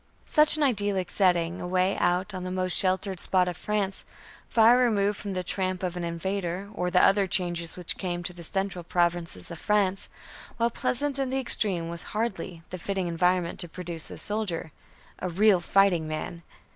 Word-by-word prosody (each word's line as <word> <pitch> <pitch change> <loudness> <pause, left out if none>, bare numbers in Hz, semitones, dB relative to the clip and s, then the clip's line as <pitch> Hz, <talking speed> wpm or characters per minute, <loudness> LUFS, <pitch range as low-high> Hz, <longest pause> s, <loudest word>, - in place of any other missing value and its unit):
Such 305 0 +4
an 305 - +2
idyllic 205 -8 0
setting, 175 -3 +2
away 185 +2 +1
out 180 +3 +1
on 185 -1 -5
the 185 - -4
most 185 0 -1
sheltered 190 0 +1
spot 185 0 +3
of 180 - -2
France 200 0 -2 0.5
far 235 +2 +6
removed 205 -4 +2
from 200 -2 -4
the 185 -1 -2
tramp 185 +1 -2
of 180 -1 -2
an 175 - -4
invader, 180 +2 -3
or 180 -2 -1
the 180 0 +4
other 195 0 +4
changes 175 -2 -2
which 180 -2 -3
came 175 -2 -3
to 180 - -4
the 170 -1 -10
central 190 +1 -1
provinces 170 - -1
of 165 - -7
France 195 -2 +1 0.5
while 235 0 +2
pleasant 275 +4 0
in 270 -1 0
the 265 - -1
extreme 200 -9 0
was 170 0 -5 0.2
hardly 190 -6 -3
the 185 - -5
fitting 195 +1 -2
environment 175 +1 +1
to 175 - -1
produce 170 -2 -5
a - - -8
soldier, 205 -7 -2 0.5
a 185 - -2
real 195 +2 +4
fighting 175 -2 +3
man. 155 +2 -5
185 Hz, 185 wpm, -27 LUFS, 175-200 Hz, 0.5 s, far